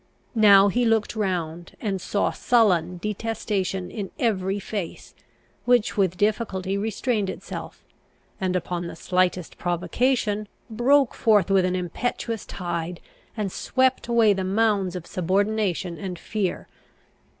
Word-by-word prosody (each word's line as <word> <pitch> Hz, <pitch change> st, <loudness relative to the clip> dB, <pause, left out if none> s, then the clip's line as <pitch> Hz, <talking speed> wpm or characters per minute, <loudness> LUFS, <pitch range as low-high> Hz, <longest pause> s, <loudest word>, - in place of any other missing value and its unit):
Now 205 Hz, -3 st, +7 dB
he 245 Hz, +5 st, +1 dB
looked 225 Hz, -2 st, +1 dB
round, 175 Hz, -5 st, -2 dB
and 195 Hz, -4 st, -2 dB
saw 205 Hz, -, 0 dB
sullen 180 Hz, -7 st, +2 dB
detestation 200 Hz, -2 st, -2 dB
in 205 Hz, -4 st, -5 dB
every 200 Hz, -7 st, 0 dB
face, 200 Hz, -3 st, -6 dB, 0.5 s
which 245 Hz, -3 st, +3 dB
with 185 Hz, -3 st, +1 dB
difficulty 205 Hz, -3 st, 0 dB
restrained 215 Hz, 0 st, -1 dB
itself, -, -, -7 dB, 0.6 s
and 185 Hz, -1 st, 0 dB
upon 175 Hz, -1 st, -2 dB
the -, -, -7 dB
slightest 180 Hz, 0 st, 0 dB
provocation 210 Hz, +4 st, 0 dB, 0.2 s
broke 265 Hz, +4 st, +3 dB
forth 210 Hz, -4 st, +3 dB
with 190 Hz, -2 st, +4 dB
an 185 Hz, 0 st, 0 dB
impetuous 215 Hz, +5 st, -3 dB
tide, 175 Hz, -1 st, -4 dB, 0.4 s
and 205 Hz, -3 st, -2 dB
swept 260 Hz, +4 st, +1 dB
away 230 Hz, -3 st, +4 dB
the 190 Hz, -1 st, -2 dB
mounds 195 Hz, -2 st, +1 dB
of 175 Hz, -2 st, -6 dB
subordination 190 Hz, -1 st, 0 dB
and 185 Hz, -3 st, -5 dB
fear. 200 Hz, +1 st, -3 dB
200 Hz, 125 wpm, -24 LUFS, 180-220 Hz, 0.6 s, Now